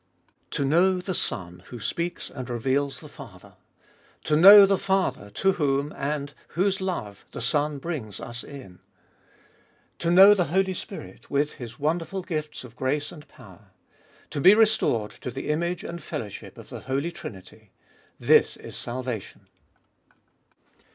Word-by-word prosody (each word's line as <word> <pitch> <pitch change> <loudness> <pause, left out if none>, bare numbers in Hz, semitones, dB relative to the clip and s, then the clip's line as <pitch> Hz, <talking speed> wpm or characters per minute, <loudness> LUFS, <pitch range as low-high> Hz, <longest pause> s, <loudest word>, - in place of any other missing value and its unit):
To 140 - -1
know 180 +6 +3
the 185 +1 -4
Son 90 - -3
who 120 - -9
speaks 170 +10 -4
and 130 -2 -7
reveals 135 +4 -1
the - - -10
Father; - - -13 0.7
to 150 - +1
know 200 +5 +10
the 195 -1 +1
Father 190 - 0
to 195 - +1
whom, 145 -4 0
and 145 0 -3 0.2
whose 190 +1 +1
love, 105 - -4
the - - -6
Son 145 +4 0
brings 135 - -5
us 120 +1 -7
in; 130 -11 -11 1.2
to 170 - -1
know 190 +4 +9
the 185 -4 +1
Holy 190 +4 +1
Spirit 95 - -9
with 145 +1 0
His 120 -3 -9
wonderful 165 +5 -2
gifts 155 -5 -4
of 120 -2 -13
grace 145 +3 -1
and 155 -2 -13
power; 105 -8 -16 0.6
to 145 - -3
be 190 +8 +8
restored 215 - +2
to - - -4
the 135 +4 -6
image 170 +3 -1
and 170 0 -6
fellowship 115 -11 -7
of - - -12
the - - -7
Holy 140 +6 -2
Trinity: 105 - -11 0.5
this - - +4
is - - -10
salvation. 125 -3 -6
145 Hz, 150 wpm, -25 LUFS, 125-175 Hz, 1.2 s, know